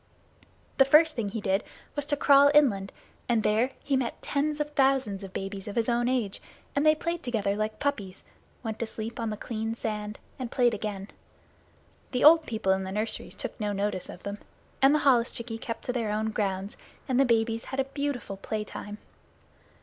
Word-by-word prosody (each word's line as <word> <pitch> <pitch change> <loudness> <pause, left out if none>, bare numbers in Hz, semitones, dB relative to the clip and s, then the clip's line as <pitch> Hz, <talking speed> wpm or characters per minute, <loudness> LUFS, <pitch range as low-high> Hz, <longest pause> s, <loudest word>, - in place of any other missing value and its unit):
The 270 - +8
first 305 +3 +6
thing 220 -4 -2
he 220 +1 -4
did 195 +1 +1 0.3
was 290 -1 -3
to 290 -1 +1
crawl 280 0 +6
inland, 200 -10 +4 0.4
and 230 -3 +2
there 220 +5 +2
he 280 - +1
met 260 -3 -1
tens 300 +1 -1
of 295 0 -2
thousands 265 -8 +2
of 195 - -8
babies 195 +1 -5
of 205 - -5
his 230 -2 +1
own 240 0 +1
age, 235 -6 -1 0.3
and 285 - +2
they 310 0 +6
played 335 +2 -3
together 215 -7 -1
like 215 +1 -2
puppies, 200 -10 -3 0.4
went 220 -2 -4
to 230 - -2
sleep 220 +1 -6
on 230 -1 -1
the 210 - -4
clean 225 0 -3
sand, 210 -2 -4 0.2
and 255 -2 -4
played 245 -2 +3
again. 200 -2 -4 1.0
The 250 - +1
old 320 +2 +8
people 220 -4 0
in 190 0 +1
the 190 - -5
nurseries 215 +3 -2
took - - -6
no 210 -1 -1
notice 200 -2 -2
of 180 - -10
them, 200 +1 -5 0.4
and 270 +2 +6
the - - +3
holluschickie 235 -3 +2
kept 230 -2 -5
to 250 - -1
their 230 -4 -1
own 215 +1 -1
grounds, 195 -1 -2 0.3
and 255 -1 +1
the - - +7
babies 230 -2 +1
had 265 - -5
a - - +4
beautiful 270 -7 -4
playtime. 210 0 -5
230 Hz, 195 wpm, -28 LUFS, 210-270 Hz, 1.0 s, The